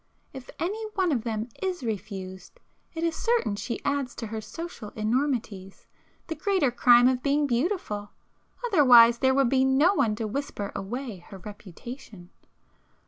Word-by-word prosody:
If 265 Hz, -1 st, -10 dB
any 410 Hz, +6 st, -3 dB
one 375 Hz, -4 st, +1 dB
of 240 Hz, -6 st, 0 dB
them 220 Hz, -1 st, -3 dB
is 370 Hz, -6 st, -2 dB
refused, 190 Hz, -4 st, -6 dB, 0.4 s
it 325 Hz, -, -3 dB
is 335 Hz, -1 st, 0 dB
certain 460 Hz, -, 0 dB
she 235 Hz, +3 st, -5 dB
adds 280 Hz, -3 st, -1 dB
to 230 Hz, -, -5 dB
her 220 Hz, 0 st, -5 dB
social 330 Hz, -2 st, -8 dB
enormities, 220 Hz, -4 st, -2 dB, 0.4 s
the 325 Hz, -, -4 dB
greater 370 Hz, -7 st, +1 dB
crime 245 Hz, 0 st, +6 dB
of 255 Hz, -1 st, +1 dB
being 290 Hz, +2 st, +1 dB
beautiful, 240 Hz, -, -2 dB, 0.6 s
otherwise 245 Hz, -, +7 dB
there 265 Hz, 0 st, +3 dB
would 270 Hz, -3 st, +3 dB
be 260 Hz, 0 st, +3 dB
no 270 Hz, +8 st, +4 dB
one 220 Hz, -, +1 dB
to 220 Hz, -, -3 dB
whisper 215 Hz, -3 st, -4 dB
away 230 Hz, +2 st, -5 dB
her 195 Hz, -, -9 dB
reputation! 205 Hz, 0 st, -11 dB
245 Hz, 150 wpm, -26 LUFS, 215-290 Hz, 0.6 s, otherwise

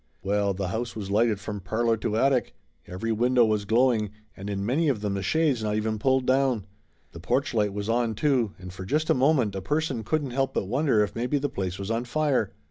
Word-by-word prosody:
Well, 100 Hz, 0 st, +1 dB
the 95 Hz, -1 st, -3 dB
house 115 Hz, +5 st, -3 dB
was 100 Hz, -3 st, -5 dB
lighted 110 Hz, 0 st, +2 dB
from 105 Hz, 0 st, -5 dB
parlor 115 Hz, +5 st, 0 dB
to 110 Hz, 0 st, -2 dB
attic. 135 Hz, +1 st, +1 dB, 0.3 s
Every 105 Hz, +6 st, -3 dB
window 120 Hz, +2 st, +3 dB
was 105 Hz, -2 st, 0 dB
glowing 115 Hz, -1 st, +2 dB, 0.3 s
and 100 Hz, +2 st, -7 dB
in 100 Hz, -1 st, -2 dB
many 145 Hz, +8 st, +1 dB
of 120 Hz, -7 st, -1 dB
them 105 Hz, -2 st, -1 dB
the 100 Hz, -, -2 dB
shades 145 Hz, -, +1 dB
not 105 Hz, -1 st, 0 dB
even 110 Hz, 0 st, -1 dB
pulled 130 Hz, +2 st, +2 dB
down. 130 Hz, -5 st, +2 dB, 0.5 s
The 85 Hz, -, -10 dB
porch 125 Hz, -, 0 dB
light 105 Hz, -3 st, +1 dB
was 100 Hz, +1 st, -4 dB
on, 115 Hz, -1 st, +1 dB
too, 125 Hz, -5 st, +1 dB
and 90 Hz, 0 st, -9 dB
for 95 Hz, -, -7 dB
just 150 Hz, +11 st, 0 dB
a -, -, +6 dB
moment 130 Hz, -5 st, +2 dB
a 95 Hz, -, -4 dB
person 140 Hz, +1 st, -1 dB
couldn't 145 Hz, +3 st, -1 dB
help 135 Hz, +1 st, -1 dB
but -, -, 0 dB
wonder 125 Hz, 0 st, +2 dB
if 105 Hz, -, -4 dB
maybe 125 Hz, +5 st, 0 dB
the 145 Hz, +1 st, -1 dB
place 95 Hz, -1 st, -3 dB
was 100 Hz, +2 st, -4 dB
on 115 Hz, +2 st, -1 dB
fire. 135 Hz, -5 st, 0 dB
115 Hz, 225 wpm, -26 LUFS, 100-130 Hz, 0.5 s, a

